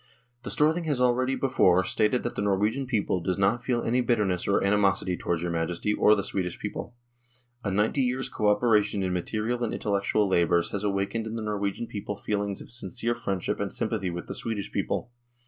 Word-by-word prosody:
" 120 0 -43
The - - -5
Storthing 160 +3 +2
has 145 -5 0
already 125 +1 +2
before 95 -10 +3
stated 110 +6 +1
that 120 - -2
the - - -3
Norwegian 105 +7 +1
people 110 -6 0
does 90 +1 -1
not 100 +5 +2
feel 120 -2 0
any 125 +2 +2
bitterness 105 -7 +1
or 100 - +2
animosity 100 -2 +2
towards 85 -1 -2
your 85 - -1
Majesty 85 +5 -1
or 105 0 +5
the 100 - -1
Swedish 95 -3 -2
people.... 120 - -6 0.7
A 100 - -1
ninety 105 +8 +1
years' 130 +1 0
co 105 - -1
operation 105 -1 +3
in 90 -1 -1
material 110 +7 -1
and 115 - -1
intellectual 100 0 +1
labours 85 -2 +2
has 100 0 -3
awakened 100 +3 -1
in 110 - -5
the 115 - -3
Nor 105 -1 -2
wegian 100 +3 -2
people 105 0 -5
feelings 100 -1 -2
of - - -11
sincere 120 0 -2
friendship 100 -7 -2
and - - -2
sympathy 100 -5 -2
with 85 0 -5
the - - -6
Swedish 110 -4 -4
people. 120 - -2
105 Hz, 200 wpm, -27 LUFS, 95-120 Hz, 0.7 s, or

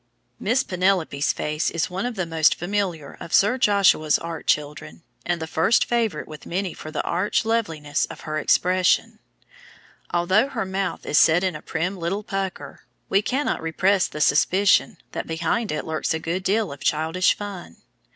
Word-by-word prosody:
] 120 0 -45
Miss 255 +3 +3
Penelope's 180 -6 +1
face 150 +1 -2
is 165 -1 -1
one 190 +7 -2
of 245 - -5
the 185 -3 -2
most 160 -2 +3
familiar 175 -5 -3
of 165 - -2
Sir 215 +6 +3
Joshua's 200 - +4
art 165 -1 -7
children, 150 +2 -2 0.2
and 175 -1 0
the 160 - -3
first 165 +7 +2
favorite 225 -9 -1
with 155 -1 -11
many 185 0 -2
for 155 - -9
the 155 - -3
arch 185 +5 0
loveliness 160 -10 -1
of - - -11
her 155 0 -3
expression. 180 +4 +2 0.9
Although 185 +8 +2
her 245 -7 -3
mouth 190 +1 -3
is 150 - +3
set 165 +3 +5
in 185 -3 0
a 155 - -7
prim 175 +4 -2
little 180 +5 -3
pucker, 195 -2 -5 0.3
we 195 - +3
cannot 265 +6 -1
repress 185 +4 +1
the 150 - -7
suspicion 190 +7 +3
that - - -5
behind 165 +7 -1
it 150 - -3
lurks 160 0 -1
a - - -2
good 170 +4 -3
deal 205 -1 0
of 140 - -9
childish 160 +4 +1
fun. 195 - -8
175 Hz, 175 wpm, -23 LUFS, 160-200 Hz, 0.9 s, set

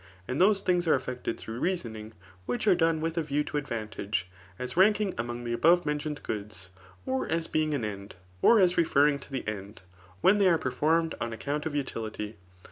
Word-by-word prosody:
And 130 +6 -1
those 200 +1 +4
things 180 -1 +1
are 155 - +5
effected 125 -3 -4
through 115 +2 -7
reasonings 110 - -3 0.3
which 125 +9 -2
are 200 - +6
done 165 -2 +2
with 165 +1 -1
a - - +1
view 150 -1 0
to 150 0 -2
advaotagev^ 110 -6 -3 0.3
as 125 - -5
ranking 205 +1 +4
among 120 +1 -4
the 120 0 -2
above 170 +8 +4
me 150 - +1
nt 150 - -3
ioned 150 -1 -4
goods, 100 -3 -6 0.4
or 130 -1 -1
as 165 0 0
being 155 -2 0
an 120 -6 -2
end, 100 -2 -7 0.3
or 230 - +6
as 180 -2 +4
referring 145 -3 +3
to 140 - -13
the 130 -4 -4
end» 100 -1 -6 0.4
when 205 - +5
they 195 -2 +5
are 170 - +4
performed 160 +4 +1
on 120 0 -2
account 145 +6 -3
of 150 - -5
utility. 110 -6 -4
145 Hz, 205 wpm, -28 LUFS, 115-165 Hz, 0.4 s, are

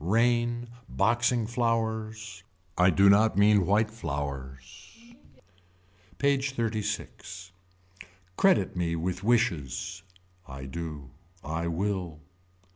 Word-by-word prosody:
Rain. 120 +4 +2 0.2
Boxing 120 +3 +1
flowers. 110 -4 -2 0.3
I 90 +1 +5
do 100 +3 +5
not 105 +1 +5
mean 100 -3 +5
white 105 +2 +2
flowers. 70 - -6 1.2
PAGE 140 -1 +1
XXXVI. 105 -5 -4 0.8
Credit 190 - +3
me 85 -2 -1
with 90 +3 -3
wishes. 90 - 0 0.5
I 65 -1 -8
do. 75 -2 -6 0.3
I 85 +2 -3
will. 90 -2 -2
100 Hz, 90 wpm, -28 LUFS, 85-115 Hz, 1.2 s, I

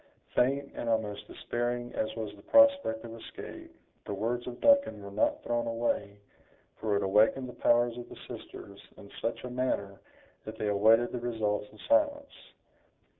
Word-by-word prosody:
Faint 140 +2 +1
and 115 - -4
almost 105 -2 -1
despairing 120 0 -3
as 110 0 -2
was 110 -2 -5
the 100 - -16
prospect 280 - +4
of 115 - -8
escape, 115 - -10 0.3
the - - -4
words 120 +4 -2
of 120 0 -6
Duncan 280 - +4
were 100 - -8
not 105 - 0
thrown 120 0 -1
away, 115 -3 -1 0.6
for 110 -2 0
it 100 - +1
awakened 110 +7 +3
the 125 - -8
powers 120 0 +3
of 120 - -9
the - - -11
sisters 100 0 -10 0.2
in 100 - -13
such 115 - -2
a 125 - -5
manner 125 -6 -2 0.4
that 110 0 -8
they 105 - -1
awaited 110 +4 +4
the 125 - -3
results 110 -3 -1
in 110 - -16
silence. 290 -1 +2
115 Hz, 170 wpm, -30 LUFS, 105-125 Hz, 0.6 s, prospect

